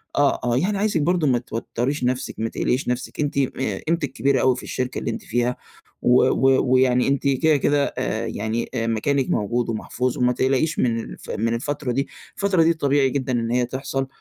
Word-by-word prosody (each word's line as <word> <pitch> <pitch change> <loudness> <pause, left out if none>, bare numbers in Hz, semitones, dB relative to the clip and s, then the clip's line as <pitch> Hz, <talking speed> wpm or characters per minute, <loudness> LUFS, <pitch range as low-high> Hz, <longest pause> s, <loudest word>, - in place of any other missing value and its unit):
آه، 145 0 +3
آه، 120 0 +1
يعني 200 +7 0
عايزِك 205 -5 +1
برضه 170 0 +2
ما 125 -2 +3
توتريش 120 +3 -3
نفسِك، 125 +1 -1
ما 115 0 -1
تقلقيش 130 +3 -1
نفسِك، 125 +1 -3
أنتِ 145 -2 -1
آآ 135 -1 -1
قيمتِك 160 -4 0
كبيرة 135 +1 +1
أوي 130 -1 +3
في 125 - -8
الشركة 125 0 -3
اللي - - -2
أنتِ - - -5
فيها 120 +2 0 0.5
و 125 +1 +5
و 130 +1 +3
ويعني 125 -1 +3
أنتِ 140 +1 +1
كده، 145 +3 +3
كده، 145 +1 +2
آآ - - -1
يعني 110 +3 -3
مكانِك 115 +4 0
موجود 120 +3 0
ومحفوظ، 120 +2 -2
وما 125 0 +2
تقلقيش 135 +5 +1
من 115 -2 +1
الف - - -9
من 115 +2 -1
الفترة 135 +2 -2
دي، 135 +3 -1 0.3
الفترة 195 -4 +2
دي 165 +1 +4
طبيعي 140 -3 +2
جدًا 130 -1 -2
إن 115 -1 -1
هي 125 0 +2
تحصل. 135 +1 -3
130 Hz, 195 wpm, -22 LUFS, 120-140 Hz, 0.5 s, و